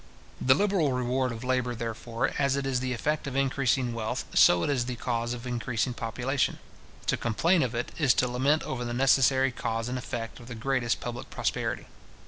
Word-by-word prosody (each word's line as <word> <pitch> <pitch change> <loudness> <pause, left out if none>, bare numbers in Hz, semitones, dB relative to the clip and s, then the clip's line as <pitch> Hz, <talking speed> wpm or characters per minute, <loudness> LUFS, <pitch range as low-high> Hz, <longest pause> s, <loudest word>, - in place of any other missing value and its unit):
The 130 +1 +5
liberal 190 -7 +2
reward 125 0 0
of 115 +1 -7
labour, 125 -1 0
therefore, 115 0 -2
as 140 -1 +2
it 140 -1 -2
is 130 -2 0
the 130 0 -2
effect 145 +5 -1
of 135 - -4
increasing 135 -2 +1
wealth, 110 -1 -3
so 90 -1 +6
it - - 0
is 125 -4 0
the 125 0 -3
cause 120 0 -2
of 120 +1 -9
increasing 120 -1 -1
population. 125 +4 -1 0.5
To - - +2
complain 165 +10 +2
of 125 -2 -1
it, 120 - -2
is 135 -7 +4
to 125 - +2
lament 135 +5 +1
over 125 -2 -3
the 120 0 -3
necessary 135 0 +4
cause 115 -2 -3
and 125 +1 -2
effect 120 -2 -5
of 120 - -12
the 125 - -7
greatest 120 -1 0
public 120 0 -6
prosperity. - - -2
125 Hz, 195 wpm, -28 LUFS, 120-135 Hz, 0.5 s, so